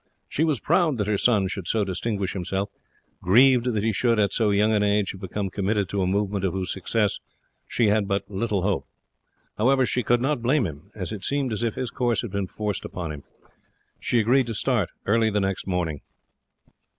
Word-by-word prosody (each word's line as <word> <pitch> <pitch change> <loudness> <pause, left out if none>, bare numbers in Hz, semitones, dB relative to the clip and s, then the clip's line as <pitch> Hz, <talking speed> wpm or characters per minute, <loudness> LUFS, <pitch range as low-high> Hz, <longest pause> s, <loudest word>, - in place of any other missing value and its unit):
She 155 - -1
was 155 -6 +1
proud 165 -4 +2
that 105 - 0
her 105 -1 0
son 105 -6 +3
should 95 -2 -5
so 110 +1 +1
distinguish 100 +1 -2
himself, 95 +2 -3 0.5
grieved 125 +5 +5
that 105 -3 -1
he 110 0 +1
should, 115 +2 +2
at 100 -2 +2
so 110 -3 +2
young 105 +2 +3
an 105 - +2
age, 105 -1 +2
have 95 - -11
become 95 +1 -3
committed 100 0 0
to 100 - -1
a 90 - +1
movement 100 0 0
of 95 -3 0
whose 95 -1 -2
success 105 +2 0 0.5
she 120 - +1
had 105 -1 +2
but 100 0 0
little 100 -1 -1
hope. 100 0 -1 0.7
However, 130 +3 +4
she 125 - 0
could 120 +1 +2
not 135 0 0
blame 130 +2 +2
him, 75 -3 -8
as 95 -3 -5
it 105 -3 -6
seemed 140 -4 0
as 105 - -3
if 115 -2 -1
his 125 -2 -3
course 120 -2 0
had 115 - -5
been 100 -1 -2
forced 105 0 -3
upon 85 -3 -5
him. 75 -2 -8 0.8
She 120 - 0
agreed 125 +3 +3
to 115 - -3
start 115 -4 +1 0.2
early 110 +2 +3
the 105 -1 0
next 95 -1 -2
morning. 85 -6 -2
105 Hz, 210 wpm, -25 LUFS, 95-120 Hz, 0.8 s, grieved